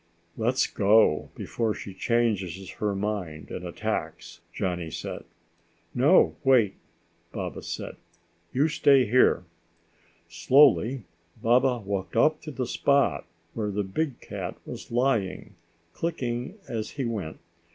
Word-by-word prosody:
"Let's 120 +3 +1
go 105 -6 +3
before 115 -3 -2
she 100 - -8
changes 95 -5 -1
her 105 -2 0
mind 95 -6 -4
and - - -5
attacks," - - -4
Johnny 90 -3 -3
said. - - -6 0.7
"No, 145 +9 +4
wait!" 125 -8 +4 0.6
Baba - - -5
said. - - -6 0.5
"You 140 +4 +2
stay 140 -4 +4
here." 125 +5 +4 0.8
Slowly 130 - +4 0.4
Baba 125 +3 +3
walked 95 -3 -3
up 155 0 +3
to 155 - -8
the 130 -3 -3
spot 130 - +1 0.3
where 105 -2 -2
the 100 0 -1
big 130 +8 -3
cat - - -6
was - - -9
lying, 120 -6 0 0.4
clicking 130 - -3
as 110 -3 -3
he 135 - -1
went. 100 -9 -4
115 Hz, 120 wpm, -26 LUFS, 100-130 Hz, 0.8 s, No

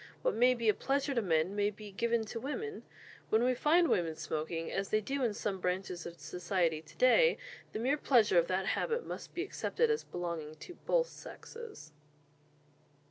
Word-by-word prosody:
What - - +2
may 250 +2 +4
be 235 -2 -2
a 215 - +6
pleasure 275 +4 0
to 235 - +1
men 170 0 +1
may 205 0 +2
be 210 0 -10
given 230 +2 0
to 230 +2 -5
women. 410 - -4 0.5
When 220 +2 +3
we 255 +1 +3
find 330 +7 +4
women 165 - +1
smoking, 160 +1 -3
as 195 0 -2
they 215 - +3
do 270 +6 -3
in 225 -4 +1
some 200 -3 -2
branches 180 -1 -2
of 170 0 -10
society 170 +1 -1
to 155 - -18
day, 480 - +5 0.3
the - - -4
mere 260 +6 +1
pleasure 225 -11 +4
of 170 - +1
that 185 +1 0
habit 465 - 0
must - - -7
be 350 - -1
accepted 455 +3 0
as 450 - 0
belonging 170 -3 -5
to 355 - -10
both - - +4
sexes." 450 - -10
215 Hz, 190 wpm, -33 LUFS, 175-275 Hz, 0.5 s, a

